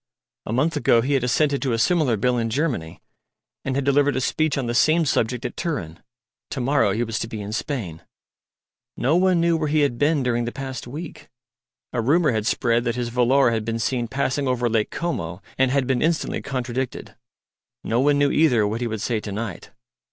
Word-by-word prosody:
A - - -3
month 150 +7 +1
ago 120 -5 +3
he 135 +4 -1
had 135 -3 +2
assented 140 +3 +1
to 130 -4 0
a - - +1
similar 145 -3 +2
Bill 125 +4 +1
in 115 0 -1
Germany, 115 - -2 0.6
and 130 - -2
had 140 - 0
delivered 140 0 +3
a - - +1
speech 155 +2 0
on 135 - -1
the 120 - -2
same 155 +7 +3
subject 125 -1 0
at 120 - -4
Turin. 90 - -4 0.5
To 135 - -4
morrow 125 -4 +2
he 115 +4 0
was 115 -1 -3
to - - -3
be 110 -1 -6
in 105 +1 -6
Spain. 110 - -4 1.0
No 135 +7 +2
one 185 -1 +3
knew 170 0 +3
where 155 -1 -1
he 150 +1 +2
had 130 -5 0
been 145 -1 +2
during 120 -1 0
the 120 - -3
past 130 -2 -6
week. 150 +6 -8 0.6
A 120 - 0
rumour 150 +6 +3
had 110 -1 -1
spread 120 -1 +1
that 120 -1 -1
his 120 -1 -2
volor 125 +1 +3
had 110 -1 -1
been 115 +1 -2
seen 120 +1 -1
passing 135 +2 -1
over 125 -1 +1
Lake 110 -2 0
Como, 90 - -3 0.2
and 130 0 +2
had 135 0 +1
been 130 -1 0
instantly 165 0 0
contradicted. 130 -1 -4 0.7
No 115 - 0
one 145 +2 +3
knew 145 0 +3
either 125 -9 +3
what 110 +3 -3
he 120 - 0
would 110 -2 -4
say 115 -1 -1
to 105 - -7
night. 105 -1 -5
125 Hz, 210 wpm, -23 LUFS, 115-145 Hz, 1.0 s, ago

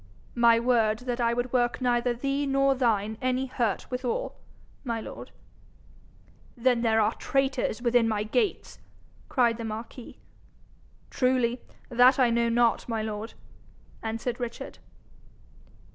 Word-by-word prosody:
'My 235 -1 +5
word 230 -3 +2
that 245 -1 -2
I 235 0 +2
would 245 +1 -3
work 240 -1 +1
neither 245 -1 +1
thee 275 +4 -2
nor 275 0 +3
thine 220 -4 0
any 255 +1 0
hurt 240 -5 -2
withal, 250 -1 -2 0.5
my 230 -4 -2
lord.' - - -9 1.3
'Then 245 0 +2
there 225 -1 +2
are 215 +1 +2
traitors 265 -4 -1
within 240 -1 +3
my 215 -2 0
gates!' 405 - -2 0.5
cried 240 -4 +2
the 230 - -6
marquis. 225 +2 -7 0.9
'Truly, 250 -2 +1 0.3
that 245 +2 +5
I 250 -3 +3
know 235 0 +2
not, 235 +1 +2
my 225 -2 -1
lord,' 215 +1 -5 0.7
answered 225 +2 -3
Richard. 240 -1 -6
240 Hz, 130 wpm, -27 LUFS, 230-255 Hz, 1.3 s, My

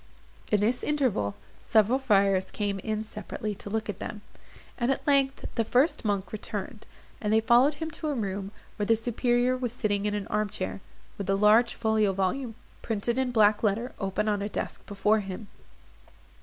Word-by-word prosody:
In 210 -1 +3
this 235 +4 +1
interval, 250 - 0 0.3
several 225 +4 +3
friars 195 -6 +3
came 205 -2 -2
in 215 +2 -2
separately 215 0 -5
to 200 - -9
look 220 +1 -2
at 205 -3 -5
them; 210 - -6 0.6
and 240 0 +1
at 270 - -2
length 275 -1 +2
the 230 - +1
first 255 +8 +2
monk 200 -3 -1
returned, 210 +1 -5 0.3
and 210 - -1
they 220 - +5
followed 245 +6 +4
him 320 +2 -5
to 310 +1 -5
a 295 - 0
room, 195 -3 -3 0.3
where 205 - -1
the 225 - +5
superior 240 +2 +1
was 250 -2 -2
sitting 205 -4 0
in 210 - -1
an 205 -1 -3
arm 210 0 -1
chair, 95 - -4 0.4
with 195 - -4
a 195 - +3
large 215 +4 +4
folio 220 -3 +2
volume, 220 +6 -1 0.3
printed 230 +3 -1
in 260 -1 +1
black 215 -2 +4
letter, 225 +4 0
open 195 +2 -1
on 205 -1 +1
a 205 - -2
desk - - -4
before 210 +2 +2
him. 195 +1 -7
215 Hz, 185 wpm, -28 LUFS, 200-240 Hz, 0.6 s, they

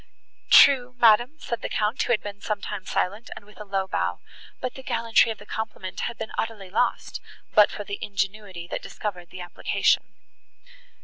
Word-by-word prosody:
"True, 255 -3 +7
madam," 240 +5 +5
said 235 -6 -4
the - - -4
Count, 215 +4 0
who - - 0
had 225 - +2
been 205 0 -7
some 210 -2 -2
time 195 -1 -6
silent, 205 +6 -1
and 205 - -11
with 210 +1 -14
a - - -7
low 195 -1 -1
bow, - - -1 0.4
"but 255 - -3
the 265 - -10
gallantry 230 -2 +3
of 220 - -6
the 205 - -14
compliment 210 -4 -5
had 235 - -3
been 220 - -6
utterly 210 -5 -4
lost, 240 +4 -1 0.3
but 210 -2 +7
for 205 - -6
the 200 0 -6
ingenuity 195 -3 -3
that - - -3
discovered 180 -5 -6
the 185 - -9
application." 175 - 0
210 Hz, 185 wpm, -25 LUFS, 195-230 Hz, 0.4 s, True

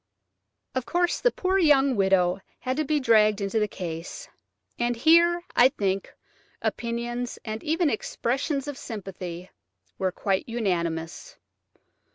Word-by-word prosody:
Of 260 -1 -3
course 350 0 +1
the - - +5
poor 380 -4 0
young 280 -5 +4
widow 190 -2 +2 0.2
had 255 0 -1
to 310 - +1
be 300 0 +1
dragged 215 -4 +4
into 200 +2 0
the 210 - +1
case, 175 - -6 0.5
and 240 0 +1
here, 335 +6 +4
I 250 +2 +7
think, 195 -7 -2 0.5
opinions 240 +1 -3
and 220 0 -5
even 325 +2 +1
expressions 275 +6 -2
of 285 -2 -5
sympathy 185 -4 -7 0.5
were 190 -1 +1
quite 195 +3 -1
unanimous. 175 - -2
235 Hz, 130 wpm, -26 LUFS, 195-290 Hz, 0.5 s, I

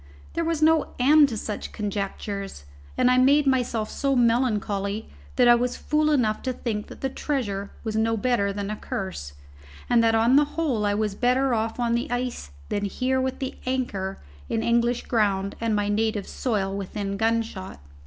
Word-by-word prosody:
There 335 - -1
was 325 -2 0
no 320 -1 +3
end 290 +3 +6
to 225 - -4
such 210 0 -5
conjectures, 200 - -4 0.3
and 250 - +4
I 255 - +4
made 285 +3 +5
myself 245 -5 0
so 275 -1 0
melancholy 220 -4 +1 0.3
that 245 - +5
I 240 - +9
was 245 +1 0
fool 305 0 +1
enough 240 -8 +1
to 255 - -2
think 215 -4 -4
that - - -12
the 270 - +1
treasure 205 -11 -2
was 220 -1 -3
no 225 +1 +1
better 220 -3 +1
than 200 +1 -4
a - - -2
curse, 185 - -5 0.5
and 235 -1 +4
that 225 0 +3
on 230 +4 +4
the 295 - +5
whole 255 -11 +1
I 205 - +1
was 210 -1 -1
better 255 +4 +2
off 225 +1 -1
on 235 -1 +1
the 240 +5 -1
ice 245 - -3 0.2
than 205 - -1
here 260 +6 0
with 260 0 -2
the 265 -1 -4
anchor 210 -7 -2 0.3
in 225 - -1
English 235 +1 +1
ground 200 -4 0
and 225 -2 +1
my 205 -1 0
native 210 -1 0
soil 195 -6 -1
within 200 0 -4
gunshot. 220 - -1
230 Hz, 185 wpm, -25 LUFS, 205-255 Hz, 0.5 s, I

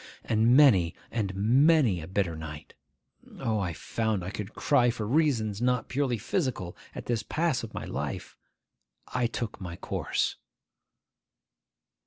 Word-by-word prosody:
And 115 +3 +4
many 95 - +6 0.2
and 105 -5 -1
many 125 - +4
a 80 - -8
bitter 95 -3 -1
night 75 -1 -8 0.6
(O, 110 -2 0
I 90 -3 -1
found 110 +2 -2
I 95 - -4
could 105 0 -6
cry 125 -5 +3
for 115 -2 -2
reasons 115 -7 +1
not 125 -2 +1
purely 130 -2 0
physical, 110 - -2 0.2
at - - -6
this 120 -3 0
pass 155 +4 0
of 115 -1 -8
my - - -4
life!) - - -4 0.7
I 125 -2 +1
took 115 -2 -5
my 90 -2 -5
course. - - -2
110 Hz, 140 wpm, -28 LUFS, 95-125 Hz, 0.7 s, many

